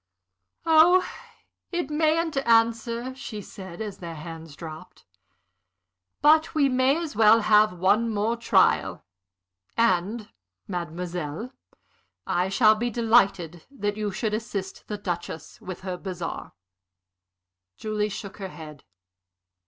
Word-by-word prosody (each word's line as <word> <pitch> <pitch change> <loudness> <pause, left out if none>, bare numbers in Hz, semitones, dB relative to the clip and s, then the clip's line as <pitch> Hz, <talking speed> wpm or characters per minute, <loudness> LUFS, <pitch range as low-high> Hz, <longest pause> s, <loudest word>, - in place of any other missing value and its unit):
"Oh, 335 +3 +6 0.6
it 345 -4 -2
mayn't 315 +1 +1
answer," 230 0 +2
she 260 -5 -7
said, 190 -2 -9
as 210 -3 -6
their 170 -2 -7
hands 160 -1 -9
dropped. 165 +3 -10 1.2
"But 310 +2 +5
we 285 -3 +4
may 260 +3 +3
as 330 -7 -5
well 220 +1 +6
have 215 -1 +4
one 210 +6 +2
more 215 +2 0
trial. 235 - +2 0.7
And, 210 0 +1 0.4
mademoiselle, 175 - -5 0.7
I 180 +2 0
shall 215 +2 +5
be 235 +3 -2
delighted 200 -8 +2
that 205 -7 -3
you 210 -1 -2
should 215 +2 -2
assist 205 -3 -5
the 210 - -4
Duchess 175 -5 -6
with 185 -1 -7
her 185 -1 -4
bazaar." 180 -3 -6 1.2
Julie 215 -1 -2
shook 200 0 -7
her 195 -2 -6
head. 155 -5 -11
210 Hz, 115 wpm, -25 LUFS, 180-235 Hz, 1.2 s, Oh